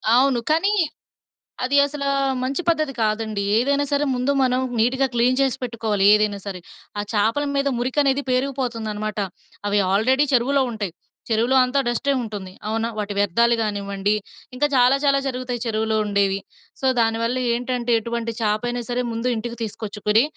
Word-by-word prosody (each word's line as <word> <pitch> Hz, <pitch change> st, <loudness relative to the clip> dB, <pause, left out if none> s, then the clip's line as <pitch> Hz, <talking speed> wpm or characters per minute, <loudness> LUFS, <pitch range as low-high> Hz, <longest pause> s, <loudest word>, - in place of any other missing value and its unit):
అవును. 260 Hz, -1 st, +4 dB
కానీ 385 Hz, +6 st, +3 dB, 0.9 s
అది 280 Hz, +3 st, +1 dB
అసల 285 Hz, 0 st, -4 dB, 0.4 s
మంచి 275 Hz, +7 st, -1 dB
పద్ధతి 310 Hz, -4 st, +1 dB
కాదండి. 215 Hz, -1 st, -1 dB
ఏదైనా 280 Hz, +4 st, +2 dB
సరే 285 Hz, +1 st, +2 dB
ముందు 250 Hz, +3 st, +1 dB
మనం 255 Hz, 0 st, +2 dB, 0.2 s
నీట్‌గా 260 Hz, +4 st, +2 dB
క్లీన్ 245 Hz, +2 st, +3 dB
చేసి 265 Hz, -1 st, +2 dB
పెట్టుకోవాలి 220 Hz, -5 st, -1 dB
ఏదైనా 210 Hz, -1 st, +1 dB
సరే. 185 Hz, -2 st, -5 dB, 0.4 s
ఆ -, -, 0 dB
చాపల 225 Hz, +7 st, +1 dB
మీద 280 Hz, 0 st, +1 dB
మురికి 255 Hz, +4 st, -2 dB
అనేది 275 Hz, 0 st, +1 dB
పేరుకుపోతుందనమాట. 230 Hz, -5 st, -2 dB, 0.5 s
అవి 205 Hz, 0 st, +2 dB
ఆల్రెడీ 260 Hz, +8 st, +3 dB
చెరువులో 265 Hz, +3 st, +3 dB
ఉంటాయి. 205 Hz, -6 st, -4 dB, 0.4 s
చెరువులో 235 Hz, +4 st, +2 dB
అంతా 260 Hz, +2 st, 0 dB
డస్టే 255 Hz, +4 st, 0 dB
ఉంటుంది. 205 Hz, -5 st, -6 dB, 0.2 s
అవునా? 225 Hz, +1 st, -1 dB
వాటి 205 Hz, -1 st, -3 dB
వ్యర్థాలు 235 Hz, +5 st, +3 dB
కానివ్వండి, 200 Hz, -1 st, -1 dB, 0.4 s
ఇంకా 295 Hz, +4 st, +2 dB
చాలా 250 Hz, +2 st, +5 dB
చాలా 275 Hz, -1 st, +4 dB
జరుగుతాయి 250 Hz, -2 st, -3 dB
చెరువులో 220 Hz, -1 st, 0 dB
ఉండేవి. 200 Hz, -1 st, +1 dB, 0.4 s
సో, 265 Hz, -, -1 dB
దానివల్ల 230 Hz, +2 st, +1 dB, 0.2 s
ఏంటంటే 245 Hz, 0 st, -1 dB
ఎటువంటి 235 Hz, 0 st, -3 dB
చాప 210 Hz, -1 st, +1 dB
అయినా 240 Hz, 0 st, -2 dB
సరే 245 Hz, 0 st, 0 dB
ముందు 230 Hz, +2 st, -2 dB
ఇంటికి 235 Hz, +2 st, -5 dB
తీసుకొచ్చుకొని 215 Hz, 0 st, 0 dB
235 Hz, 150 wpm, -22 LUFS, 215-260 Hz, 0.9 s, చాలా